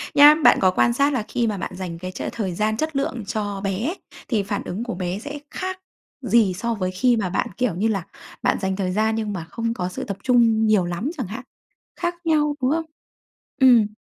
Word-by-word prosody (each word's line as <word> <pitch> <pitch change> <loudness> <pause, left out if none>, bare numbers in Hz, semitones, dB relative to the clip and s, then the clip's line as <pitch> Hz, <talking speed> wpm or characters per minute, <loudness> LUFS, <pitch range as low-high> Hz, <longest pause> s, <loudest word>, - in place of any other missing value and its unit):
Nhá, 295 +1 +9
bạn - - +7
có 185 - +5
quan 235 +5 +3
sát 280 +3 +2
là 245 -5 0
khi 235 -1 0
mà 210 -2 -1
bạn 185 - -4
dành 180 -2 -5
cái 185 +1 -5
ch - - -8
thời 195 -6 -3
gian 215 +3 0
chất 315 +3 -2
lượng 270 -4 -2
cho 205 -2 -3
bé, 200 - -1 0.3
thì 215 -5 +1
phản 200 +1 -3
ứng 200 +6 -4
của 240 -6 -4
bé 180 +1 -3
sẽ 290 +5 -7
khác 375 0 -4 0.4
gì 230 -6 +3
so 230 +6 -2
với 185 -4 -2
khi 235 +6 +2
mà 200 -4 -1
bạn, - - 0
kiểu 250 -8 0
như 205 +5 +1
là, 200 -5 -1 0.4
bạn - - +2
dành 190 -1 -1
thời 190 -2 -1
gian 220 +3 +1
nhưng 215 -2 -2
mà 180 -4 -4
không 230 0 -2
có 180 -5 -3
sự 180 - -5
tập 200 - -5
trung 230 -3 +4
nhiều 210 -4 +3
lắm 175 +10 -2
chẳng 255 -8 -3
hạn? 225 +6 -7 0.5
Khác 345 0 -2
nhau, 300 -2 +2
đúng 255 +1 +2
không? 325 +1 0 0.8
Ừm. 240 -5 +7
220 Hz, 230 wpm, -23 LUFS, 190-255 Hz, 0.8 s, Nhá